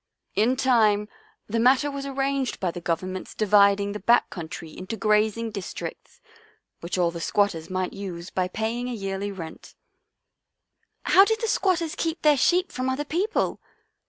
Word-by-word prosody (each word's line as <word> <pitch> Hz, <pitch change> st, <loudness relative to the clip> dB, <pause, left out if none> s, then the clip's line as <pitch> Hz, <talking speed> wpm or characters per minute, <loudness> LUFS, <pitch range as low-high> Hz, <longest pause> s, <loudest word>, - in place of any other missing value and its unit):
In 230 Hz, +5 st, +2 dB
time 220 Hz, -6 st, +3 dB, 0.4 s
the 230 Hz, +2 st, -2 dB
matter 260 Hz, +5 st, +4 dB
was 280 Hz, 0 st, -5 dB
arranged 275 Hz, -1 st, -1 dB
by 180 Hz, -3 st, -1 dB
the 175 Hz, -, -7 dB
Govern 175 Hz, +2 st, -2 dB
ment's 185 Hz, -, -7 dB
dividing 200 Hz, -1 st, +4 dB
the 210 Hz, -, -5 dB
back 235 Hz, +5 st, +3 dB
country 165 Hz, -1 st, -7 dB
into 190 Hz, +5 st, -6 dB
grazing 215 Hz, +2 st, +1 dB
districts, 200 Hz, -4 st, -7 dB, 0.6 s
which 170 Hz, +2 st, -4 dB
all 175 Hz, -2 st, +2 dB
the 170 Hz, 0 st, -7 dB
squatters 190 Hz, -4 st, 0 dB
might 185 Hz, 0 st, -2 dB
use 185 Hz, -3 st, -7 dB
by 185 Hz, -1 st, 0 dB
paying 225 Hz, +5 st, -3 dB
a -, -, -3 dB
yearly 195 Hz, -1 st, -3 dB
rent." 165 Hz, -5 st, -9 dB, 0.6 s
" -, -, -51 dB
How 385 Hz, -, +9 dB
did 445 Hz, +2 st, +1 dB
the 455 Hz, -, -1 dB
squatters 350 Hz, -6 st, +1 dB
keep 330 Hz, 0 st, -3 dB
their 300 Hz, -1 st, +6 dB
sheep 360 Hz, +7 st, +2 dB
from 255 Hz, +1 st, -2 dB
other 275 Hz, +3 st, -2 dB
people?" 370 Hz, +9 st, -1 dB
215 Hz, 165 wpm, -25 LUFS, 185-270 Hz, 0.6 s, How